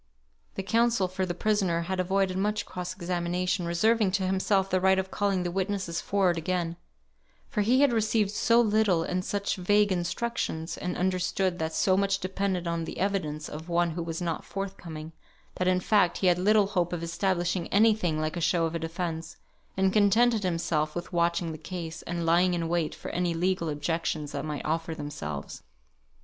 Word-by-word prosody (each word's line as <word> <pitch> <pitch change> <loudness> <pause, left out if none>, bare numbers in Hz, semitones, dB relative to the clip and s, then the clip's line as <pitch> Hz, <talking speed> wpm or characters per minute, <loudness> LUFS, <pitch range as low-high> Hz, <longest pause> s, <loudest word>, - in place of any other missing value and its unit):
The 195 - -3
counsel 230 -1 +2
for 185 +1 -2
the 175 - -3
prisoner 190 -4 +1
had 185 +2 -3
avoided 190 0 +1
much 210 +2 0
cross 180 0 -5
examination, 180 0 -1
reserving 215 +5 +3
to 195 -1 +1
himself 190 +1 +1
the 185 -1 0
right 190 0 +4
of 190 0 -2
calling 200 -3 0
the 175 - -2
witnesses 190 -2 -2
forward 185 -4 +1
again; 170 0 -2 0.7
for 220 -6 -1
he 245 +6 +3
had 280 -4 +4
received 215 -2 +1
so 230 +2 +3
little, 215 -6 +3
and 180 +2 -2
such 200 +1 -2
vague 205 +2 +3
instructions, 175 -2 -2
and 180 -1 -4
understood 185 0 0
that 160 0 -2
so 185 - +3
much 195 0 +2
depended 190 -1 -2
on 170 -1 -1
the - - -7
evidence 160 -7 -1
of 160 +3 -8
one 170 0 +2
who 170 +2 -4
was 165 +1 -4
not 165 -2 -2
forthcoming, 170 -5 -6 0.5
that 180 - 0
in 185 0 +3
fact 185 -1 +2
he - - -2
had 180 -1 +4
little 210 +2 +4
hope 180 -3 -1
of 170 -1 -3
establishing 175 0 -1
any 220 +2 +5
thing 175 -7 -1
like 155 +1 -2
a 175 - -3
show 165 +1 +2
of 165 - -3
a 165 - -2
defence, 165 0 -4 0.4
and 190 0 +2
contented 220 +2 +4
himself 165 -4 -1
with 175 0 -5
watching 170 0 +1
the 155 - -7
case, 165 -1 -6
and 170 -1 -2
lying 175 +2 +3
in 170 -1 -2
wait 170 -2 -1
for - - -7
any 175 -1 0
legal 180 -1 0
objections 150 0 -2
that 140 -1 -4
might 150 -2 -4
offer 160 +1 -1
themselves. 75 - -6
180 Hz, 190 wpm, -28 LUFS, 170-195 Hz, 0.7 s, any